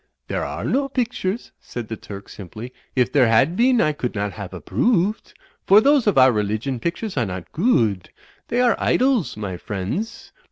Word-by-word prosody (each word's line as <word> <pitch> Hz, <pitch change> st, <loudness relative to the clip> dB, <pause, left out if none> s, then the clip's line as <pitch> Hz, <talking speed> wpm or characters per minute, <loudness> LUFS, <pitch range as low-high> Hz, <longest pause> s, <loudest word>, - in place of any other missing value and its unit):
"There -, -, -1 dB
are -, -, -5 dB
no 275 Hz, +1 st, 0 dB
pictures," 240 Hz, -5 st, -2 dB
said 120 Hz, -3 st, -7 dB
the 110 Hz, -, -4 dB
Turk, 100 Hz, -2 st, -10 dB
simply, 110 Hz, +6 st, -9 dB, 0.2 s
"if 125 Hz, -2 st, +2 dB
there 130 Hz, -4 st, +4 dB
had 135 Hz, +9 st, +3 dB
been 245 Hz, +3 st, +3 dB
I 155 Hz, -, +3 dB
could 125 Hz, -6 st, -4 dB
not 100 Hz, 0 st, -1 dB
haf 100 Hz, -4 st, -7 dB
approo 195 Hz, -, +1 dB
ooved. -, -, -25 dB, 0.3 s
For 200 Hz, +2 st, +8 dB
those 275 Hz, 0 st, +3 dB
of 205 Hz, -, +2 dB
our 130 Hz, 0 st, +7 dB
Religion 110 Hz, +4 st, -2 dB
pictures 170 Hz, -, -3 dB
are 120 Hz, -, +2 dB
not 90 Hz, -1 st, -7 dB
goo 200 Hz, -, +3 dB
ood; 90 Hz, -3 st, -10 dB, 0.4 s
they 245 Hz, -, +1 dB
are 245 Hz, -2 st, +4 dB
Idols, 255 Hz, -, +1 dB
my 100 Hz, -4 st, -4 dB
friendss. 105 Hz, -, -5 dB
135 Hz, 190 wpm, -22 LUFS, -, 0.4 s, For